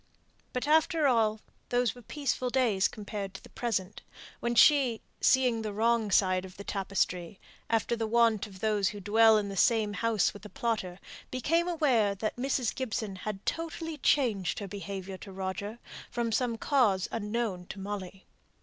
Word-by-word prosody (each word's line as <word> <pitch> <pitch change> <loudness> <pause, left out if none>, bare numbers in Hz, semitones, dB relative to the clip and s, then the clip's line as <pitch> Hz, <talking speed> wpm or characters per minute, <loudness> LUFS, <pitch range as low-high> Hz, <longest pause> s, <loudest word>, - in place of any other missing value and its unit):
But 250 +3 -3
after 315 +1 +3
all, 220 -4 +2 0.3
those 245 -2 +1
were 245 - -13
peaceful 260 0 -2
days 235 -7 +2
compared 205 -2 -6
to - - -9
the - - -15
present, 210 -5 -2 0.4
when 235 0 -1
she, 255 -3 +5 0.2
seeing 250 -3 +3
the 215 -1 -3
wrong 225 0 +2
side 185 -1 +3
of 185 -1 -11
the 200 - -7
tapestry, 190 -2 -2 0.3
after 230 +1 +1
the 225 -1 -2
wont 230 -2 +3
of 190 -2 -14
those 210 -3 +2
who 205 - -7
dwell 220 +2 +5
in 205 -1 -1
the 195 - -5
same 215 +1 +3
house 225 -2 +1
with 205 - -12
a 210 - -9
plotter, 210 -7 -2 0.3
became 330 +7 +1
aware 260 - +2
that 215 +2 -3
Mrs. 255 -1 0
Gibson 220 -5 -3
had 195 +1 -6
totally 325 -1 -3
changed 225 - +1
her 200 - -4
behaviour 195 -1 -6
to 195 - -10
Roger, 195 +3 -4 0.3
from 235 -1 -2
some 235 +1 0
cause 225 -9 +2
unknown 210 -4 -2
to 195 - -8
Molly. 195 -1 -6
220 Hz, 165 wpm, -30 LUFS, 200-245 Hz, 0.4 s, she